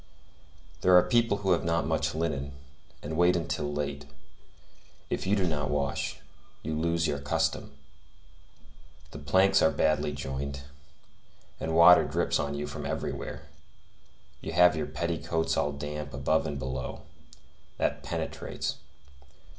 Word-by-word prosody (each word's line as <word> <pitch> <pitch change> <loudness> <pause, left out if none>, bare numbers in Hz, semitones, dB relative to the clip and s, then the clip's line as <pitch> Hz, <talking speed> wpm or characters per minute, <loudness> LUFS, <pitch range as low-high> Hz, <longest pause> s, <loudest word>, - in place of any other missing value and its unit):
There 90 +1 +6
are 90 - +7
people 115 -4 +2
who 95 -2 0
have 85 - +2
not 85 0 +1
much - - 0
linen, 70 -4 -2 0.5
and 80 +2 -4
wait 90 +2 +4
until 80 -3 -2
late; 70 -1 -3 1.1
if - - -2
you 100 - +3
do 95 -3 +1
not 75 -3 -1
wash, 70 -1 -1 0.5
you 80 - -3
lose 85 +1 0
your 70 -3 -1
custom. 70 +1 -1 1.4
The - - -8
planks 95 +7 +4
are 80 - +5
badly 75 -2 +1
joined, 70 0 -5 1.0
and 80 0 -2
water 85 +1 +8
drops - - 0
on 70 0 -2
you 75 +1 -3
from - - -6
everywhere; - - -4 1.0
you 80 - -5
have 90 0 +6
your 75 -1 -2
petticoats 80 +1 -1
all 75 - +1
damp 75 0 -6
above 80 0 +1
and 70 -2 -3
below. 65 -1 -5 0.7
That - - 0
penetrates. - - -4
80 Hz, 135 wpm, -28 LUFS, 70-85 Hz, 1.4 s, water